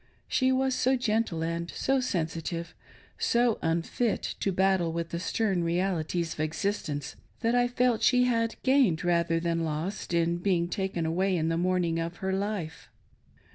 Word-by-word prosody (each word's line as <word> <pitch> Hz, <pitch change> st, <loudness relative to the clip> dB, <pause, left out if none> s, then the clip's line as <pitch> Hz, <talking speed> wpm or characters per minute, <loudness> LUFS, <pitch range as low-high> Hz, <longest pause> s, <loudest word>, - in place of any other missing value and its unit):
She 260 Hz, 0 st, +2 dB
was 260 Hz, 0 st, +1 dB
so 260 Hz, +1 st, +2 dB
gentle 215 Hz, -8 st, 0 dB
and 170 Hz, +1 st, -3 dB
so 270 Hz, +8 st, 0 dB
sensitive, 165 Hz, -5 st, -3 dB, 0.5 s
so 235 Hz, -1 st, +2 dB
unfit 170 Hz, +8 st, 0 dB, 0.2 s
to 195 Hz, -, 0 dB
battle 190 Hz, -2 st, +2 dB
with 170 Hz, 0 st, -3 dB
the 170 Hz, -, -3 dB
stern 190 Hz, -1 st, 0 dB
realities 170 Hz, -1 st, -1 dB
of -, -, -14 dB
existence, 155 Hz, -2 st, -2 dB, 0.3 s
that 230 Hz, 0 st, +1 dB
I 245 Hz, 0 st, +3 dB
felt 245 Hz, -2 st, +1 dB
she 250 Hz, -1 st, +4 dB
had 230 Hz, -2 st, +1 dB
gained 260 Hz, -, +3 dB
rather 170 Hz, -1 st, +2 dB
than 165 Hz, 0 st, -1 dB
lost 160 Hz, +6 st, -3 dB
in 170 Hz, 0 st, +1 dB
being 175 Hz, -1 st, +1 dB
taken 190 Hz, -4 st, -2 dB
away 185 Hz, +3 st, +1 dB
in 160 Hz, 0 st, 0 dB
the 165 Hz, -, +1 dB
morning 175 Hz, -2 st, +1 dB
of 165 Hz, +1 st, -3 dB
her 190 Hz, +1 st, -2 dB
life. 195 Hz, -5 st, -3 dB
180 Hz, 160 wpm, -28 LUFS, 165-225 Hz, 0.5 s, she